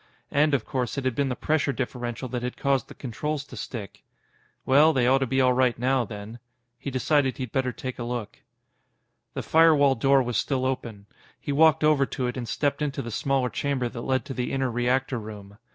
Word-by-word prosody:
And, 150 0 +3
of 135 - -2
course, 125 0 -2
it 135 - -3
had 130 - +1
been 140 +2 0
the 125 - -2
pressure 155 0 0
differential 125 -1 -4
that 125 0 -3
had 125 0 -4
caused 140 -1 +1
the - - -12
controls 145 +4 -4
to - - -12
stick. 105 -6 -7 0.6
Well, 150 +4 +5
they 125 -4 +2
ought 130 +2 +4
to 135 - 0
be 130 +2 +1
all 130 -1 +4
right 125 -1 +2
now, 130 +1 +1
then. 105 +2 -8 0.4
He - - -5
decided 135 +1 +1
he'd 130 -4 -5
better 130 -2 0
take 130 -2 -6
a - - -3
look. 120 -3 -5 1.0
The - - -3
firewall 155 -4 +5
door 135 +2 +3
was 120 -3 -2
still 130 -2 0
open. 115 -6 -4 0.3
He 145 - -4
walked 155 +2 +4
over 150 -3 +4
to 130 - -3
it 125 - -2
and 120 -3 -5
stepped 145 0 -1
into 140 -2 -2
the 120 - -6
small 135 +3 0
chamber 135 -1 -1
that 115 - -7
led 130 +2 0
to 140 - -5
the 125 -1 -3
inner 135 -2 0
reactor 125 +2 0
room. 105 -1 -10
130 Hz, 215 wpm, -26 LUFS, 120-140 Hz, 1.0 s, Well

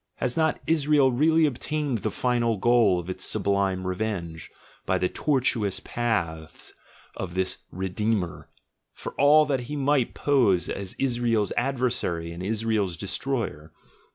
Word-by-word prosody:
Has 125 -1 -2
not 160 -1 +1
Israel 150 -4 +3
really 160 +5 +4
obtained 145 -1 -2
the 110 - -2
final 120 0 0
goal 115 -4 +4
of 85 - -7
its 95 0 -5
sublime 100 -2 0
revenge, 90 -4 -3 0.3
by - - +1
the 90 - +1
tortuous 120 -6 0
paths 85 -10 -3 0.4
of 90 -2 -5
this 95 0 -1
"Re 95 +1 -3
deemer," 100 -2 -2 0.5
for - - -7
all 150 +2 +6
that 135 -2 0
he 150 - -3
might 140 -3 +1
pose 110 - +2
as 100 -2 -4
Israel's 120 -5 0
adversary 120 -10 -1
and 85 +1 -7
Israel's 105 -3 -1
destroyer? 100 - -4
110 Hz, 135 wpm, -26 LUFS, 95-135 Hz, 0.5 s, all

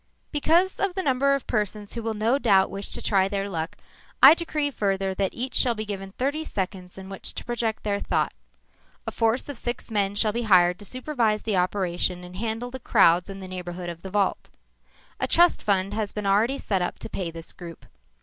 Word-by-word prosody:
_ 295 - 0
"_Because 350 +7 +3
of 390 -3 0
the 380 - -1
number 275 0 +3
of 275 - -5
persons 210 -2 -2
who 235 - -4
will 225 -1 -3
no 225 +6 +1
doubt 195 -7 +4
wish 195 +1 -4
to - - -3
try 195 -2 +3
their 200 0 -2
luck, 165 -4 -4 0.5
I 275 - +12
decree 310 -4 -2
further 195 -4 -1
that 195 0 0
each 255 +2 -3
shall 240 -2 +3
be 215 0 -4
given 195 -2 -5
thirty 285 +7 -1
seconds 185 - -5
in 190 0 -9
which 195 -1 -6
to - - -6
project 230 -2 -2
their 200 -1 0
thought. - - 0 0.7
A - - -3
force 230 +2 +1
of 285 -5 -6
six 240 -1 -3
men 200 -2 +1
shall 215 +1 +3
be 235 - -1
hired 180 -2 +5
to 205 - -9
supervise 245 -4 -1
the 210 -4 0
operation 180 -1 0
and 180 0 -10
handle 225 +4 -3
the 260 - -6
crowds 180 -6 +4
in 195 0 -7
the 190 - -7
neighborhood 180 -1 -6
of 170 -1 -8
the 190 - -7
vault. 200 0 0 0.7
A - - 0
trust 345 0 +4
fund 195 -1 +1
has 215 -2 -2
been 210 -1 -5
already 215 +7 +2
set 195 -8 -1
up 175 - -2
to - - -7
pay 180 -3 -4
this 165 0 -8
group. 170 -2 -10
205 Hz, 215 wpm, -25 LUFS, 190-240 Hz, 0.7 s, I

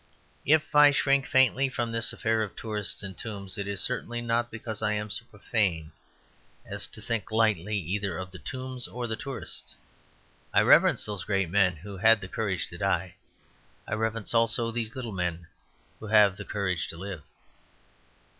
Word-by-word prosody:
If 155 +1 +3
I 150 0 +8
shrink 140 -1 +2
faintly 130 +1 +4
from 120 -2 -2
this 115 0 0
affair 110 0 0
of 105 -5 -4
tourists 105 -2 -3
and 95 -1 -5
tombs, 100 -4 -5
it 100 - -3
is 100 -2 -2
certainly 120 -1 -2
not 120 0 0
because 110 -1 -5
I 105 - +1
am 105 0 -3
so 120 - -1
profane 100 -8 -1 0.7
as - - -4
to 110 - -9
think 115 -3 -2
lightly 105 -3 +2
either 95 0 -2
of 95 +1 -6
the 95 - -10
tombs 130 -1 -2
or 125 0 -5
the 110 -1 -2
tourists. 135 +1 -6 0.8
I - - +7
reverence - - +5
those 105 -3 -4
great 95 -5 0
men 95 -3 +3
who 95 +5 -9
had 115 +3 +6
the 95 - -7
courage 95 -3 -2
to - - -10
die; - - 0 0.7
I - - -3
reverence 110 0 -2
also 115 0 +2
these 115 -1 -3
little 125 -4 -5
men 90 -3 -3 0.5
who 110 - -8
have 105 -3 +5
the - - -8
courage 95 -5 -2
to 85 - -6
live. 95 -2 -6
110 Hz, 175 wpm, -28 LUFS, 95-120 Hz, 0.8 s, I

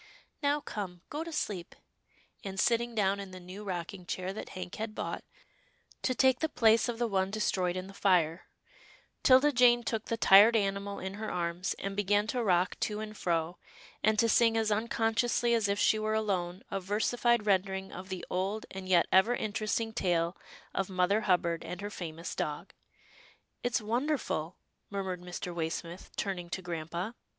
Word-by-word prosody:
" - - -44
Now 290 0 +2
come, 185 -8 -6
go 300 +2 -3
to 335 - -7
sleep," 200 - -3 0.7
and, 195 -1 -5
sitting 235 +2 +2
down 200 -2 +2
in 195 -1 -6
the 185 0 -9
new 185 +3 -9
rocking 180 -1 -5
chair 185 +1 -3
that 215 - -7
Hank 180 -1 -6
had 215 0 -4
bought, - - -4 0.8
to 255 - 0
take 260 0 +4
the 320 - 0
place 225 -2 +4
of 235 - -3
the 240 - +1
one 190 -3 0
destroyed 190 -4 0
in 185 0 -3
the 195 - -11
fire, 180 -4 +2 0.7
'Tilda 265 +2 +6
Jane 240 -2 +5
took 225 -1 -2
the 230 - -2
tired 210 +2 +8
animal 200 -1 0
in 190 +1 -5
her 215 +2 -5
arms, 175 +1 -2
and 195 0 -4
began 205 +1 +2
to 250 - 0
rock 180 -3 +2
to 210 -1 -1
and 215 0 -6
fro, 170 -2 -1 0.4
and 215 +1 +3
to 230 +1 +4
sing 230 0 +4
as 220 -1 +1
unconsciously 230 +2 +1
as 225 -3 +2
if 200 0 0
she 215 +1 +3
were 215 0 0
alone, 185 -4 -1
a 195 - -1
versified 220 +4 +1
rendering 190 -1 +1
of 185 +1 -8
the 185 -1 -5
old 195 +4 -2
and 190 -1 -7
yet 175 -2 +5
ever 190 +6 +5
interesting 215 +1 -2
tale 175 -3 +1 0.4
of 195 - -1
Mother 185 +3 +2
Hubbard 170 -2 +2
and 175 +2 -6
her 205 +1 -5
famous 165 -2 -6
dog. 150 +5 -4 0.5
" - - -29
It's 245 -1 +1
wonderful," 230 - -1 0.3
murmured 190 -3 -3
Mr. 180 0 -6
Waysmith, 170 +1 -4
turning 180 -3 -3
to 185 +1 -4
grampa. 170 +4 -4
200 Hz, 180 wpm, -31 LUFS, 180-225 Hz, 0.8 s, tired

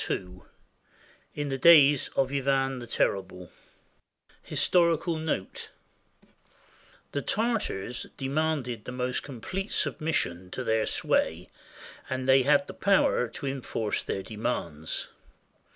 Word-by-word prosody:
II 90 -1 -4 1.0
IN 145 -1 -3
THE 135 0 -2
DAYS 145 -3 +7
OF 135 -1 +1
IVAN 135 -1 +1
THE 120 - -8
TERRIBLE 95 -5 -1 0.9
HISTORICAL 170 -1 +2
NOTE 155 -12 -3 1.4
The 140 - -2
Tartars 215 - -1
demanded 135 -5 -1
the - - -5
most 125 0 -1
complete 185 - -5
submission 95 - -1
to 130 - -3
their 110 -2 +1
sway, 85 +3 0 0.6
and 130 0 -3
they 135 0 +6
had 140 +1 +3
the - - -9
power 195 -10 +3
to 115 - -8
enforce 125 -5 -2
their 95 - -4
demands. 90 -9 -3
135 Hz, 110 wpm, -28 LUFS, 110-150 Hz, 1.4 s, DAYS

